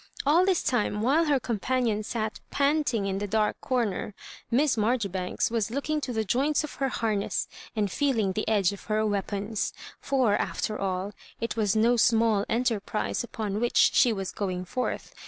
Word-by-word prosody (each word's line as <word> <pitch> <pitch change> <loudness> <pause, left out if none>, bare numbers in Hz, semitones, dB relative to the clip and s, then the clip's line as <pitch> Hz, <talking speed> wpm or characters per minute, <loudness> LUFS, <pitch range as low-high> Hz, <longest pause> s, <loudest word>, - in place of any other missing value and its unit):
All 335 +6 +4
this 375 -3 +2
time, 210 -3 0
while 295 +7 +3
her 290 -3 +2
companion 235 -1 0
sat 215 0 -3
panting 280 -7 +1
in 195 0 -1
the 205 - -3
dark 215 +1 +1
comer. 230 -5 -1 0.3
Miss 270 +3 +3
Marjoribanks 210 -5 0
was 225 -3 0
looking 290 +5 -2
to 260 - -3
the 220 -2 0
joints 280 +9 +1
of 305 - -6
her 270 - +2
harness, 215 -4 -1 0.3
and 205 -3 0
feel 280 0 +1
ing 200 -3 +1
the 215 - -2
edge 205 -4 +3
of 200 - -11
her 215 0 +1
weapons. 205 +1 -2 0.3
For, 255 -7 +2
after 215 0 -2
all, 190 +1 -2 0.3
it 230 - -2
was 215 -2 +1
no 235 +3 +4
small 225 -3 +3
enterprise 230 -2 -1
upon 215 -4 -3
which 240 +1 +4
she 245 - +5
was 195 -3 -3
going 185 -3 -3
forth. 250 +8 -3
220 Hz, 175 wpm, -27 LUFS, 205-255 Hz, 0.3 s, she